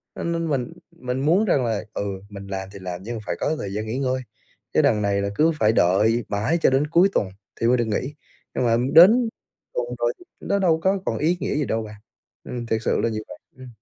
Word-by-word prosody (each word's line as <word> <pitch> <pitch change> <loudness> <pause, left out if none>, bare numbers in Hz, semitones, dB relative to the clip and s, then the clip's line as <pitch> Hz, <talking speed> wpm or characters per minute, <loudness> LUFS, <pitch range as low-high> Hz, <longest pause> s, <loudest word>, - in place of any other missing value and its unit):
Cho - - -5
nên 170 -1 -1
mình 130 -4 -2 0.2
mình 125 +1 -4
muốn 180 +8 +4
rằng 140 - +2
là, 110 -3 -1
ừ, - - -2 0.3
mình 100 -1 -9
làm 95 -1 -5
thì 100 - -9
làm 90 -1 -5
nhưng 120 +3 -5
mà 110 - -6
phải - - -2
có 155 - 0
thời 100 -7 -5
gian 105 +1 -3
nghỉ 115 +4 -3
ngơi, 130 -1 0 0.5
chứ - - +4
đằng 105 - +2
này 100 -1 +1
là 100 - -1
cứ 160 +6 +4
phải 110 0 +4
đợi 110 +5 +3
mãi 110 +10 0
cho - - +5
đến 135 +3 +2
cuối 170 +5 +4
tuần 95 - +1 0.3
thì 115 - +3
mới 125 +1 +4
được 120 - +1
nghỉ, 120 +6 -2 0.4
nhưng - - +1
mà 115 -1 +3 0.2
đến 225 +8 +7 0.4
tuần - - -1
rồi - - +1 0.3
nó 200 - -1
đâu 170 -4 +3
có 190 +3 +2
còn - - -1
ý 165 +4 +1
nghĩa - - -2
gì 150 -1 0
đâu 110 -2 -1
bạn, 105 -1 -9 0.5
ừm, 120 -1 -5
thiệt 110 -1 -1
sự - - +1
là 115 - +1
như 110 -1 -3
vậy. - - -9 0.2
Ừm. 130 0 -11
125 Hz, 250 wpm, -23 LUFS, 105-160 Hz, 0.5 s, đến